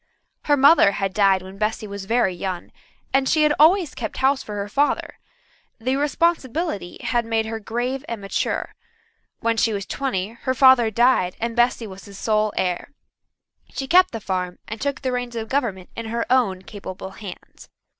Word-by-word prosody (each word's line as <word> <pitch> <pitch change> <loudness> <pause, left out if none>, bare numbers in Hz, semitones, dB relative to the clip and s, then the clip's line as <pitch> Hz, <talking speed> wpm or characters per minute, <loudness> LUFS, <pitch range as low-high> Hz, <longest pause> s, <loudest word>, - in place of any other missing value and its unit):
Her 290 -1 +3
mother 275 -6 +6
had 195 -1 -2
died 195 -2 +3
when 190 +1 -11
Bessy 215 0 -1
was 200 -1 -7
very 225 -3 +2
young, 180 0 -5 0.4
and 270 0 +3
she 310 - +3
had 300 0 +4
always 335 +1 +5
kept 220 -3 -5
house 270 +1 +2
for 210 - -7
her 200 0 -3
father. 285 +8 0 0.6
The 255 +3 -1
responsibility 295 - -1 0.2
made 225 -1 0
her 220 0 -4
grave 245 +5 -3
and 230 -2 -4
mature. 195 -1 -2 0.7
When 230 0 +1
she 225 -1 +2
was 200 -1 -3
twenty 210 -9 -2
her 235 +3 -3
father 260 -3 +6
died 230 -5 +2
and 230 0 -2
Bessy 240 -1 +2
was 195 -2 -10
his 200 -2 -11
sole 215 -1 +1
heir. 180 +9 -2 0.8
She 270 - -4
kept 365 +5 +6
the 225 - -5
farm 185 -3 -3
and 220 0 -6
took 280 0 -2
the 260 - 0
reins 245 -1 -3
of 225 -1 -4
government 225 -10 -2
in 230 -1 -5
her 230 +1 -2
own 200 -8 +2
capable 190 -2 -8
hands. 195 -2 -11
225 Hz, 175 wpm, -22 LUFS, 200-260 Hz, 0.8 s, mother